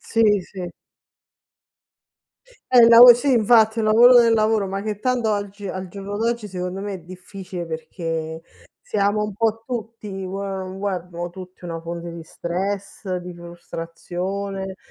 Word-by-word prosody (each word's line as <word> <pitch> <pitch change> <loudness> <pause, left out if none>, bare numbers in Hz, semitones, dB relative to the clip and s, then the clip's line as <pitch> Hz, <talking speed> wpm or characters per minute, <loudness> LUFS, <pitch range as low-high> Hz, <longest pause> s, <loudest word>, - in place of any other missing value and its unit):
Sì, 215 -3 +2
sì. 180 -2 -8 2.0
È 250 - +7
il 230 - +9
lavo 240 +1 +11
sì, 270 +3 0
infatti, 220 -1 +4
un 215 - 0
lavoro 240 +3 +7
nel 230 -1 +4
lavoro, 215 -2 +2
ma 195 +1 -3
che 210 0 -4
tanto 245 -3 +1
oggi 205 0 -4
al 185 -1 -5
giorno 200 +2 -6
d'oggi, 230 0 -1
secondo 180 0 -5
me, 205 0 -4
è 190 - -5
difficile 185 0 -8
perché 160 0 -5 0.4
siamo 210 0 0
un 210 -2 -5
po' 225 +1 0
tutti 230 -3 -6 0.2
vuoi 195 +2 -4
o 195 0 -4
non 185 0 -7
vuoi, 200 -1 -1
abbiamo 175 -1 -6
tutti 185 0 -12
una 165 -1 -5
fonte 170 0 -6
di 170 - -8
stress, 190 +3 -4
di 180 0 -7
frustrazione, 180 +3 -6
195 Hz, 155 wpm, -22 LUFS, 180-215 Hz, 2.0 s, lavo